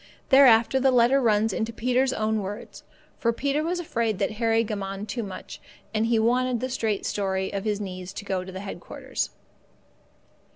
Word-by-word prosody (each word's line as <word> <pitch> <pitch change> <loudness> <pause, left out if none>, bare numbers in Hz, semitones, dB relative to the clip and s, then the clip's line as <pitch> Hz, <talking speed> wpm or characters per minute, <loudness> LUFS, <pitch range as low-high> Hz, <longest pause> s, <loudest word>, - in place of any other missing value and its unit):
Thereafter 265 -2 +6
the 265 +1 +4
letter 250 +2 +4
runs 220 -2 +2
in 220 - -1
Peter's 250 +3 +1
own 220 -2 0
words, 200 +2 -7 0.4
for 235 - +2
Peter 280 +5 0
was 350 +2 -1
afraid 230 - -1
that - - 0
Harry 225 0 +3
gammoned 200 -1 -4
too 240 - -2
much, 195 -4 -8 0.3
and 220 +1 +1
he 230 -1 +3
wanted 245 +2 +2
the 255 +2 -3
straight 220 -5 -1
story 190 -1 -1
of 200 +1 -3
his 210 -1 0
needs 185 -2 -6
to 200 - -7
go 190 -2 -1
to 190 0 -7
headquarters. 195 0 -5
225 Hz, 170 wpm, -26 LUFS, 200-250 Hz, 0.4 s, Thereafter